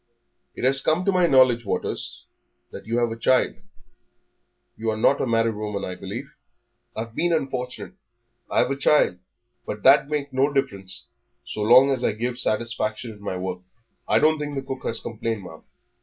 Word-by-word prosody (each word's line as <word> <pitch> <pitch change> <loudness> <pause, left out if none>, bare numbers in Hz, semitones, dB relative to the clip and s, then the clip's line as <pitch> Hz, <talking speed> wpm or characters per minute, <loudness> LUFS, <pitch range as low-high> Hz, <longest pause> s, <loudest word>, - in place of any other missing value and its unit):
"It - - -7
has 135 +1 +3
come 165 +6 +1
to 195 - +3
my 180 -2 +3
knowledge, 130 -4 +5
Waters, 100 - -4 0.5
that - - -10
you 115 +1 0
have 120 -1 +1
a - - -3
child. 125 +3 +2 1.2
You're 110 -1 -2
not 135 +5 +3
a - - 0
married 115 -1 +2
woman, 105 -1 -4
I 90 - -5
believe?" 110 +10 -7 0.6
"I've 115 0 -5
been 175 +7 0
unfortunate; 130 -2 -3 0.6
I've - - +2
a - - 0
child, 135 -9 +3 0.4
but 105 - -6
that 135 +2 +9
don't 145 - -11
make 145 -2 -3
no 135 +3 +2
difference 100 - -2 0.4
so 105 - -5
long 125 +6 +6
as 130 -2 -1
I - - +2
gives 120 +3 -3
satisfaction 115 -3 -1
in 105 -2 -14
my 100 -2 -4
work. 90 0 -4 0.5
I - - +3
don't 155 0 +3
think 145 -1 -4
that 135 - -2
the 135 - -18
cook 130 -1 -6
has 115 - -1
complained, 115 -2 -4
ma'am." 80 -3 -11
120 Hz, 185 wpm, -24 LUFS, 110-135 Hz, 1.2 s, that